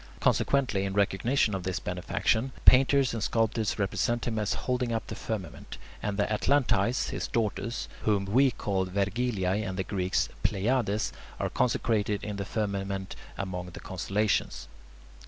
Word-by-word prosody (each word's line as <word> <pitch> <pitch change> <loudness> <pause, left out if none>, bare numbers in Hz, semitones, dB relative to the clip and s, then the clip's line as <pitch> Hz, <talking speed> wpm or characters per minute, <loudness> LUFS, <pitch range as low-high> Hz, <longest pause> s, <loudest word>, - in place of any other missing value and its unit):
Consequently, 130 -8 +2
in 100 -1 -2
recognition 105 +4 +2
of 95 - -2
this 90 0 -2
benefaction, 110 +7 -1
painters 135 0 +6
and 115 - -3
sculptors 115 0 0
represent 115 +3 0
him 110 -2 -1
as 105 -1 0
holding 125 -1 -1
up 115 -1 -1
the - - -6
firmament, 100 -7 -6 0.2
and 100 -1 -2
the 105 - +3
Atlantides, 120 0 +2
his - - -3
daughters, 115 +1 -2
whom 100 -2 +1
we 130 +8 +4
call 95 -5 -1
"Vergiliae" 100 0 0
and 95 -2 -4
the 95 - 0
Greeks 95 -1 0
[Greek: - - -16
Pleiades], 110 0 +1 0.3
are - - -1
consecrated 105 -4 +1
in 105 -1 -4
the 100 - -3
firmament 100 -2 -3 0.2
among 90 -2 -4
the 90 - -9
constellations. 100 +3 -1
105 Hz, 150 wpm, -29 LUFS, 95-120 Hz, 0.3 s, painters